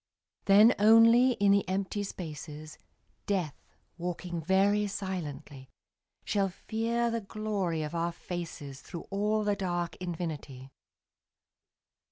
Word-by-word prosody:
Then 210 +5 +7
only 230 +4 +6
in 205 -3 +3
the 200 -2 +2
empty 195 +2 -1
spaces, 155 -5 -7 0.5
Death, 180 -8 0 0.5
walking 175 0 -4
very 200 +4 +2
silently, 155 -9 -6 0.6
Shall 200 -2 +1
fear 230 +4 -1
the 230 0 -2
glory 200 -6 -2
of 150 - -5
our 170 0 -1
faces 165 -6 -7
Through 170 -2 -8
all 210 +2 +1
the 205 -1 +1
dark 175 -3 -2
infinity. 155 -7 -6
190 Hz, 110 wpm, -30 LUFS, 165-210 Hz, 0.6 s, Then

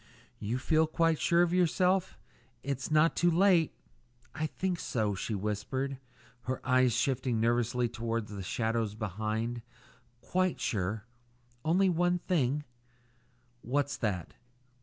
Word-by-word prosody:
"You 110 +4 -2
feel 155 +4 +2
quite 165 0 +2
sure 170 0 +4
of 175 0 0
yourself? 180 +1 +2 0.5
It's 135 -1 -3
not 155 +1 +4
too 175 - +3
late 175 -2 +4 0.4
" 120 0 -34
"I 155 +3 -2
think 180 +1 -2
so," 110 -4 -1
she 105 +3 -3
whispered, 105 +7 -2 0.5
her 130 +1 -2
eyes 130 -1 +4
shifting 125 -1 0
nervously 120 +1 +1
toward 115 -1 -3
the 105 -1 -7
shadows 110 +2 -1
behind. 110 +3 -3 0.6
"Quite 185 +6 0
sure, 105 -1 -2 0.6
only 185 +5 +3
one 175 0 +2
thing 150 -5 0 0.5
" 120 +1 -38
"What's 140 +3 0
that?" 95 -7 -2
125 Hz, 130 wpm, -31 LUFS, 115-160 Hz, 0.6 s, sure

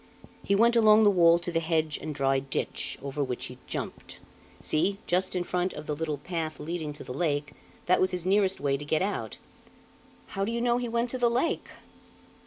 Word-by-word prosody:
"He 200 - +1
went 235 +3 +4
along 220 -1 +6
the 205 - +6
wall 170 -3 +6
to 175 +1 -4
the 165 - +1
hedge 160 -2 0
and 155 0 -5
dry 135 -1 +2
ditch, 135 -1 -3
over 140 +1 -2
which 125 -2 -4
he - - -9
jumped. - - -6 0.4
See, 195 +6 0
just 185 +1 0
in 180 - 0
front 180 +1 -1
of 150 - -8
the 150 - -2
little 155 -1 -2
path 160 +1 -4
leading 155 0 -4
to 150 - -8
the 125 - -7
lake, 145 -1 -1 0.3
that 180 - +3
was 185 - +3
his 180 -2 -4
nearest 195 0 +2
way 140 -1 +1
to 145 - -8
get 155 +3 +1
out." 115 - -3 0.9
"How 195 - -2
do 210 - -1
you 235 - -1
know 240 0 +2
he 245 -1 -3
went 235 +1 0
to 255 - -3
the 240 -1 +4
lake?" 255 +8 0
175 Hz, 210 wpm, -28 LUFS, 150-200 Hz, 0.9 s, along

